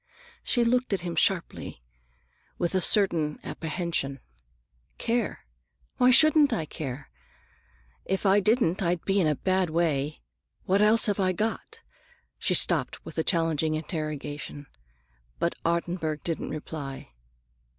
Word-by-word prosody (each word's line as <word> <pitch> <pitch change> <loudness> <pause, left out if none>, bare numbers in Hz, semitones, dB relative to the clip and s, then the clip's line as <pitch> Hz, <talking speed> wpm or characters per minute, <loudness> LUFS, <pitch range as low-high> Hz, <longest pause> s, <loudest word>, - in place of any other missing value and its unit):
She 240 - +1
looked 245 -1 +1
at 195 - 0
him 175 -1 -4
sharply, 170 - -1 0.7
with 175 +1 -1
a 185 - +2
certain 170 -8 +3
apprehension. 160 -5 -3 0.8
"Care? 230 - -2 0.5
Why 250 - +5
shouldn't 300 +2 +6
I 165 -9 -1
care? 140 - -7 0.9
If 190 +2 -2
I 195 +1 +5
didn't, 205 -3 +2
I'd 175 -2 -1
be 195 0 +2
in 165 - +2
a 150 - +1
bad 185 +2 0
way. 155 -3 -1 0.4
What 195 +2 +2
else 215 +2 +5
have 205 -1 0
I 185 -1 +2
got?" 220 +5 -4 0.6
She - - +2
stopped - - +1
with - - -6
a - - +2
challenging 160 -3 +1
interrogation, 150 -2 -5 0.7
but 170 - 0
Ottenburg 170 -2 -1
did 165 -2 -2
not - - -5
reply. 145 - -7
170 Hz, 130 wpm, -27 LUFS, 155-200 Hz, 0.9 s, shouldn't